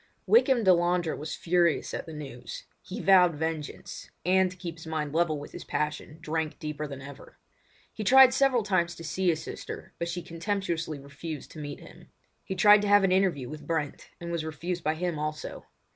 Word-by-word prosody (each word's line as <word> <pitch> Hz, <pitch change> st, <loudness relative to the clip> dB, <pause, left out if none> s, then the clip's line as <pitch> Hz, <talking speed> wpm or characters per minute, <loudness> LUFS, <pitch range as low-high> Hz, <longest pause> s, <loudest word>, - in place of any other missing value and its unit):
Wykham 265 Hz, -, +5 dB
Delandre 175 Hz, -2 st, +3 dB
was 155 Hz, +2 st, -5 dB
furious 170 Hz, -1 st, +1 dB
at -, -, -4 dB
the -, -, -7 dB
news. 135 Hz, -5 st, -8 dB, 0.2 s
He 185 Hz, -, -7 dB
vowed 180 Hz, -4 st, +5 dB
vengeance—and 165 Hz, +4 st, -1 dB
to 180 Hz, -, -12 dB
keep 170 Hz, -2 st, -6 dB
his 165 Hz, -, -11 dB
mind 150 Hz, -2 st, -3 dB
level 165 Hz, -2 st, +2 dB
with 145 Hz, -, -9 dB
his -, -, -8 dB
passion 150 Hz, 0 st, -3 dB
drank 160 Hz, -1 st, -2 dB
deeper 150 Hz, 0 st, -4 dB
than 135 Hz, -1 st, -8 dB
ever. 140 Hz, 0 st, -12 dB, 0.6 s
He 215 Hz, -, -5 dB
tried 260 Hz, +3 st, +8 dB
several 260 Hz, -4 st, +3 dB
times 175 Hz, -4 st, +1 dB
to 165 Hz, -, -10 dB
see 185 Hz, +3 st, 0 dB
his 160 Hz, -2 st, 0 dB
sister, -, -, -8 dB
but 170 Hz, -, -2 dB
she 175 Hz, 0 st, -4 dB
contemptuously 170 Hz, -3 st, -2 dB
refused 140 Hz, +2 st, -8 dB
to 155 Hz, -, -10 dB
meet 145 Hz, -1 st, -6 dB
him. -, -, -14 dB, 0.4 s
He 190 Hz, -, -4 dB
tried 205 Hz, +2 st, +7 dB
to 205 Hz, -, -1 dB
have 205 Hz, 0 st, +6 dB
an 190 Hz, -, +3 dB
interview 185 Hz, -9 st, +2 dB
with 150 Hz, +2 st, -9 dB
Brent 155 Hz, -4 st, -3 dB
and 170 Hz, 0 st, -6 dB
was 170 Hz, -2 st, -2 dB
refused 170 Hz, +3 st, -4 dB
by 155 Hz, +1 st, +1 dB
him 170 Hz, -1 st, -2 dB
also. 155 Hz, 0 st, -5 dB
170 Hz, 190 wpm, -28 LUFS, 155-185 Hz, 0.6 s, tried